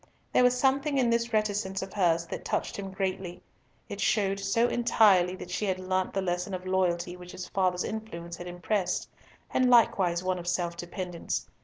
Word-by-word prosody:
There - - +5
was 250 0 +4
something 275 +2 +2
in 245 -3 +3
this 235 0 +1
reticence 205 -3 0
of 190 - -8
hers 170 -4 +2
that - - -6
touched - - -2
him 195 -1 -5
greatly; 190 -2 -3 0.4
it - - -6
showed 195 -2 +1
so 200 +5 +2
entirely 205 -7 +4
that 180 -1 -9
she 210 - -1
had 190 -2 0
learnt 185 0 -1
the 195 - 0
lesson 180 +1 -2
of 185 0 -7
loyalty 180 -2 0
which 180 0 -11
his 185 - -6
father's 185 -2 0
influence 170 -6 -6
had 175 - -8
impressed, 180 +2 -1 0.5
and 255 -1 +3
likewise 185 -7 +4
one 185 -1 0
of 175 - -8
self 175 -1 -1
dependence. 175 0 -4
190 Hz, 185 wpm, -28 LUFS, 180-215 Hz, 0.5 s, There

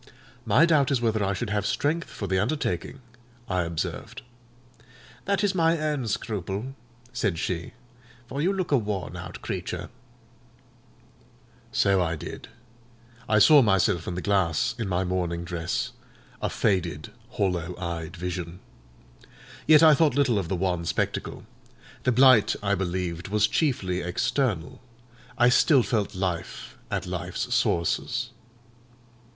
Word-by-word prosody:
"My 125 +10 +5
doubt 150 -5 +3
is 135 - +2
whether 110 -3 0
I 100 0 0
should 110 +1 -3
have 105 -1 0
strength 150 +10 -1
for 100 - -6
the 95 -1 +1
undertaking," 120 - -2 0.5
I 90 -1 0
observed. 85 -2 -4 1.0
"That 200 0 0
is 205 -1 +2
my 165 -2 +3
own 150 -5 -2
scruple," 105 +3 -3 0.4
said 95 -6 -1
she; 85 0 -3 0.5
"for 135 +4 -4
you 180 +5 +2
look 190 -4 -2
a 140 - +5
worn 100 -4 -4
out - - -8
creature." - - -4 1.8
So 95 -1 +3
I 80 -2 0
did. 75 - -8 0.8
I 105 - +4
saw 145 +7 +8
myself 95 -5 +2
in 90 - -3
the 90 - -4
glass, 95 -6 +1
in 110 - -2
my 95 0 0
mourning 90 -2 -2
dress, 90 +9 -3 0.5
a - - 0
faded, 85 -8 -1 0.2
hollow 90 -3 -1
eyed 85 -1 -5
vision. 90 0 -5 1.1
Yet 155 +1 +7
I 155 -1 +8
thought 150 -3 +3
little 130 -7 +2
of 95 - -3
the 95 - -1
wan 90 -2 -1
spectacle. 85 - -2 0.6
The 125 - +4
blight, 130 -2 +6
I 100 0 +1
believed, 90 -2 -2
was 105 +1 +2
chiefly 105 - 0
external: 90 - -1 0.6
I 120 0 +5
still 130 +1 +5
felt 105 -2 -1
life 85 -9 -4
at - - -2
life's - - -3
sources. 85 -1 0
100 Hz, 135 wpm, -26 LUFS, 90-130 Hz, 1.8 s, saw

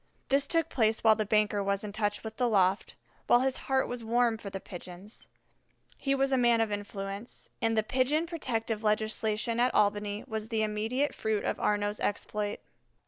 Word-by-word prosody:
This 275 +1 +3
took 330 -1 +1
place 220 -6 +1
while 220 -1 +7
the 215 -1 -2
banker 210 -1 +2
was 200 0 -1
in 210 - -5
touch 205 0 -1
with 220 0 -7
the 245 -2 +2
loft, 195 -2 +2 0.3
while 240 - +5
his 265 0 +1
heart 265 0 +2
was 245 -1 -4
warm 230 0 +2
for 205 - -7
the 195 - -5
Pigeons. 185 +3 -9 0.7
He 275 0 0
was 270 0 +1
a 265 - +3
man 240 -1 +4
of 225 -2 +1
influence, 200 +1 -6
and 225 -1 +1
the 220 - +3
Pigeon 265 +8 +1
Protective 230 -9 -2
legislation 215 +1 0
at 250 +1 +2
Albany 205 0 +1
was 220 0 -4
the 220 -2 +1
immediate 220 +7 0
fruit 220 -2 -1
of - - -1
Arnaux's 205 0 0
exploit. 205 0 -2
220 Hz, 185 wpm, -30 LUFS, 205-245 Hz, 0.7 s, while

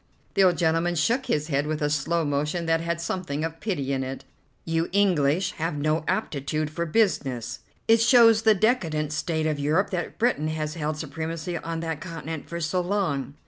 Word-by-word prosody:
The 195 - +4
old 180 -2 +4
gentleman 165 +1 +1
shook 235 - +1
his 150 +1 0
head 140 0 0
with 155 0 -2
a 150 - +1
slow 160 +3 0
motion 150 +4 -1
that 165 0 +2
had 170 0 -2
something 170 -4 -3
of 165 0 -4
pity 140 -10 -2
in 135 -1 -1
it. 130 +1 -6 0.4
"You 165 0 0
English 180 -3 +2
have 165 -2 -1
no 155 +2 0
aptitude 150 +2 -1
for 170 +2 -3
business. 150 - 0 0.3
It 225 0 +5
shows 230 -2 +6
the 220 -1 +5
decadent 165 - +1
state 160 +1 -1
of 155 -2 0
Europe 155 +7 +1
that 175 -2 -3
Britain 225 -10 +1
has 155 -1 -2
held 155 -1 -3
supremacy 160 +3 -4
on 165 0 -4
that 160 -2 -4
continent 165 -3 -6
for 170 - -4
so 170 +3 0
long." 170 -8 -1
165 Hz, 185 wpm, -25 LUFS, 150-180 Hz, 0.4 s, shows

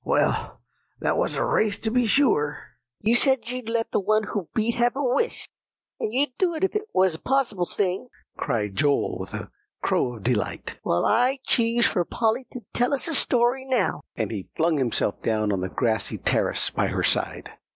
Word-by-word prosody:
"Well, - - 0 0.4
that - - +1
was - - 0
a - - +1
race, 220 - +1
to 220 - -2
be 245 -1 +2
sure." 175 - +3 0.4
"You 220 +3 +2
said 265 0 +4
you'd 250 -3 -5
let 230 0 -1
the - - +2
one 215 +2 +2
who 200 -4 -4
beat 225 +1 +1
have 240 +1 +1
a 285 - -2
wish, 265 - 0 0.5
and 215 - -2
you'd 255 +1 0
do 355 -3 +2
it 320 - -4
if 385 - +1
it 425 +1 -2
was 185 -2 +3
a 160 - -7
possible 235 -9 0
thing," 195 +4 -1 0.3
cried 105 -4 -2
Joel 145 -1 +1
with - - -7
a - - -7 0.3
crow 125 -1 +1
of 110 - -12
delight. 115 -4 -2
"Well, 85 - +1
I 250 +5 +3
choose 235 0 +3
for 175 - +2
Polly 230 +7 -1
to 250 - -7
tell 245 +4 +2
us 275 - -2
a 330 - -1
story 250 -1 +2
now;" 255 - 0
and 110 -3 -2
he 100 -4 -6
flung 160 -1 +2
himself 120 -5 0
down 110 -2 0
on 95 -2 -1
the 95 - -3
grassy 115 0 -1
terrace - - +1
by - - 0
her - - -2
side. - - 0
225 Hz, 200 wpm, -25 LUFS, -, 0.5 s, said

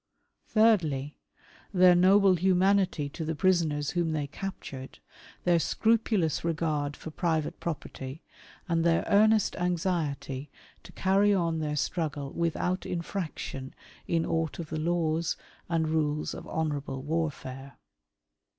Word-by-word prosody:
Thirdly, 160 - +2 0.5
their 180 -2 +6
noble 190 +2 +5
humanity 185 -2 +2
to 160 - -6
the 160 +1 -2
prisoners 155 -4 +1
whom 170 -2 0
they 150 -2 -1
captured, 140 -5 -7 0.5
their 175 -1 +4
scrupulous 215 - +1
regard 150 -3 -1
for 160 - -8
private 160 -2 -1
property, 145 -2 -6 0.4
and 165 -2 +1
their 165 -1 +2
earnest 215 +1 +4
anxiety 160 -6 -2 0.3
to - - -13
carry 200 +2 +3
on 165 -3 0
their 150 -1 -2
struggle 150 -3 -2
without 170 +2 -1
infraction 170 -6 -5 0.3
in 165 -1 +1
aught 165 -1 -1
of 165 -3 -7
the 155 - -2
laws 165 0 0 0.3
and 165 -2 +1
rules 155 -1 0
of - - -8
honourable 145 -4 -3
warfare. 140 -4 -4
165 Hz, 120 wpm, -28 LUFS, 150-180 Hz, 0.5 s, their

